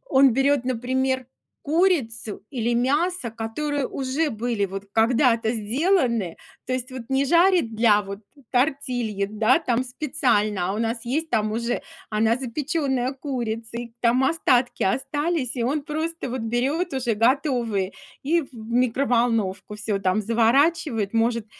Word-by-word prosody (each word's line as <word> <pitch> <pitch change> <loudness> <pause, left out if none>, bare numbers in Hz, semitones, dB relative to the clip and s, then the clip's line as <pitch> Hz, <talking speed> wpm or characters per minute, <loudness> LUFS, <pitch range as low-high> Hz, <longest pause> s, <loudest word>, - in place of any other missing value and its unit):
он 265 -2 +5
берёт, 270 0 +2
например, 260 +1 -1 0.4
курицу 285 - 0
или 240 -3 -1
мясо, 285 +3 0
которые 260 +6 -3
уже 275 +4 -1
были 225 -2 -1
вот 195 +1 -6
когда-то 230 0 +3
сделаны. 235 - 0 0.3
То 255 - -1
есть 255 0 -4
вот 255 - -6
не 270 +1 +2
жарит 340 -5 +3
для 215 -2 +4
вот 200 +1 -7 0.3
тортильи, 245 -6 0
да 220 +6 +3
там, 250 -4 0
специально, 245 - 0
а 195 - -1
у 210 - -3
нас 230 +1 -2
есть 315 +6 -1
там 215 -1 +1
уже 235 +2 -1 0.3
она 220 +2 +2
запеченная 265 0 -1
курица. 235 -5 -4
И 235 -1 -7
там 245 +2 +3
остатки 265 -5 +2
остались, 275 - -1
и 235 - -1
он 285 +5 0
просто 315 0 -3
вот 255 0 -3
берёт 270 +10 -1
уже 245 -4 0
готовые 230 - +1 0.3
и 330 +4 +2
в 275 - -15
микроволновку. 230 -3 0
Всё 210 -1 -2
там 190 +2 +1
заворачивает, 230 - +2
может 230 -1 +1
245 Hz, 140 wpm, -24 LUFS, 225-275 Hz, 0.4 s, он